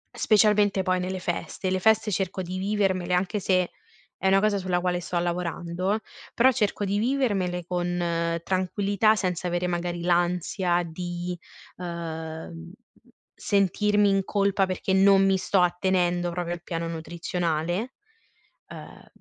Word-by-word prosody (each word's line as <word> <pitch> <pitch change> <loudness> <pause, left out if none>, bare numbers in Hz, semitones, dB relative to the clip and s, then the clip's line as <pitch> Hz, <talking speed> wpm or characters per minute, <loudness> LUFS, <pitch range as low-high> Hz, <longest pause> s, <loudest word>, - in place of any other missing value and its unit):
specialmente 210 -2 +3
poi 185 -1 +1
nelle 185 +1 -3
feste, 185 +1 -3
le 185 - +1
feste 220 +1 +3
cerco 190 0 -2
di 185 +1 -5
vivermele- 190 -3 0
anche 190 +4 0
se 185 -2 +1 0.4
è 190 - -2
una 195 +1 +5
cosa 205 -1 +1
sulla 180 -1 0
quale 180 0 0
sto 175 0 -4
lavorando- 175 +2 -1 0.4
però 255 +3 +5
cerco 210 -3 -1
di 200 +1 0
vivermele 205 -9 0
con 175 -1 -1
tranquillità, 200 +3 +1
senza 180 -3 -2
avere 175 +1 -1
magari 175 0 -2
l'ansia 175 +1 +1
di, 175 +1 -5 0.4
uhm, 160 - -6 0.6
sentirmi 205 +1 +2
in 195 -1 +2
colpa 200 -1 +1
perché 185 +1 -2
non 195 0 +5
mi 195 0 +3
sto 190 0 +2
attenendo 175 0 +1
proprio 175 0 -3
al 175 - -7
piano 165 -2 -3
nutrizionale, 170 +5 -2 0.8
uhm, - - -11
180 Hz, 135 wpm, -26 LUFS, 175-195 Hz, 0.8 s, una